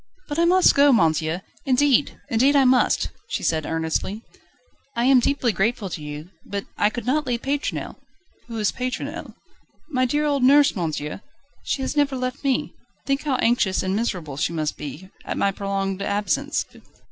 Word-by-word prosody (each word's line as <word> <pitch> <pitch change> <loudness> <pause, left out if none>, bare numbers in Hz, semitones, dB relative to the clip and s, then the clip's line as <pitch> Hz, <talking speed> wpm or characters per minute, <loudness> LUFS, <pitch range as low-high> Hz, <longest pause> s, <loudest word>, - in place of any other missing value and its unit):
"But 295 +1 -3
I 340 - +4
must 365 +2 +5
go, 285 0 +5
monsieur. 165 - +2 0.2
Indeed, 275 0 +2
indeed 270 +3 +3
I 275 -1 +5
must!" 255 0 +3 0.2
she - - -3
said 155 -2 0
earnestly. 165 +6 -2 0.7
"I 235 +1 +1
am 265 -1 +6
deeply 255 -1 +1
grateful 210 0 -1
to 160 - -5
you, 150 +4 -8
but 200 0 -5
I 205 - +3
could 230 0 -6
not 290 +2 0
leave 240 -1 -2
Pétronelle." 280 +1 -3 0.5
"Who 230 -1 -6
is 210 -2 +1
Pétronelle?" 255 0 -5 0.6
"My 255 -2 +2
dear 295 +4 0
old 285 -2 +1
nurse, 280 +2 +5
monsieur. 155 -2 -3 0.4
She 270 - -2
has 265 - -3
never 285 -2 +2
left 255 +2 -4
me. 270 -2 0 0.3
Think 275 +1 -1
how 280 -3 +1
anxious 230 -6 +2
and 190 +1 -1
miserable 175 - -3
she 165 +3 -1
must 155 -2 -2
be, 150 +7 -8
at - - -4
my 200 - +2
prolonged 195 -1 -3
absence." 200 -4 -1
235 Hz, 170 wpm, -23 LUFS, 185-270 Hz, 0.7 s, am